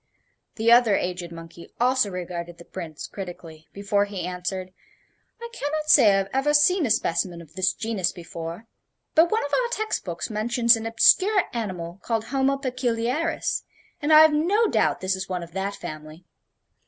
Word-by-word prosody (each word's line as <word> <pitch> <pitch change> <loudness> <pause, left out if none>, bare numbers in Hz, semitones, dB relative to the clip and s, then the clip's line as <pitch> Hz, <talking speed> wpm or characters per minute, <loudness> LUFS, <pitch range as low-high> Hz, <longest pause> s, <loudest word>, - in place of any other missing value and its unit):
The 230 +1 +2
other 235 -4 +6
aged 180 -2 -3
monkey 165 0 -11
also 250 -2 +2
regarded 175 -2 -6
the 170 - -14
Prince 165 -5 -7
critically 170 -4 -9
before 200 0 0
he 195 -4 -5
answered: 180 +1 -5 0.7
"I 470 - -6
can 290 -9 -4
not 305 0 0
say 210 - +7
I 195 - +3
have 195 0 -1
ever 280 +3 +2
seen 310 +1 +4
a - - -3
specimen 175 -5 0
of 160 -2 -14
this 185 +1 +1
genus 205 -5 -2
before. 170 +2 -8 0.5
But 330 +1 +5
one 440 -3 0
of 285 - -7
our - - +2
text 435 -2 -2
books 175 +4 -5
mentions 235 +2 +3
an 225 0 -5
obscure 375 - +4
animal 185 -6 -5
called 225 -2 -1
Homo 270 +3 0
Peculiaris, 255 +4 -1 0.4
and 295 +2 0
I 310 0 +9
have 315 -1 +6
no 375 +10 +2
doubt - - +1
this 190 0 0
is 190 0 -6
one 180 -2 -3
of 170 - -11
that 195 +2 -3
family. 155 +3 -9
205 Hz, 180 wpm, -24 LUFS, 180-270 Hz, 0.7 s, I